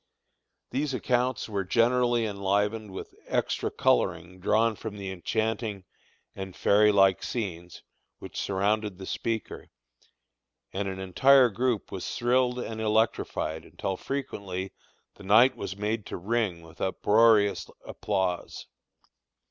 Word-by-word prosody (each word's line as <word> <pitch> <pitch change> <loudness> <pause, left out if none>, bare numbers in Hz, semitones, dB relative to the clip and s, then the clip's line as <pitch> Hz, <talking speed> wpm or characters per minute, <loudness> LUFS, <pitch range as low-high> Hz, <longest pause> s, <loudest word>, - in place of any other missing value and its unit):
These 135 +1 -1
accounts 125 0 0
were 100 -3 -2
generally 120 +3 +2
enlivened 105 +1 -1
with 95 - -8
extra - - -1
coloring 90 +6 0
drawn 110 +4 +2
from 105 0 -7
the 100 -1 -5
enchanting 105 +2 -2 0.5
and 95 -1 -7
fairy 105 +1 +4
like 95 -2 +4
scenes 90 -7 -5 0.3
which - - -6
surrounded 100 0 0
the 95 - -8
speaker, 115 +2 -4 1.0
and 100 +1 -2
an 95 -1 -4
entire 125 +8 +5
group 120 0 -1
was 95 - -5
thrilled 125 +1 +2
and 115 -3 -4
electrified 110 -7 0
until 95 - -4
frequently 100 -8 -5 0.4
the - - -13
night 115 +7 +5
was 100 -1 -6
made 105 +1 -2
to - - -5
ring 100 -3 -1
with 80 0 -15
uproarious 105 -1 +3 0.2
applause. 95 -4 -2
105 Hz, 120 wpm, -27 LUFS, 95-115 Hz, 1.0 s, entire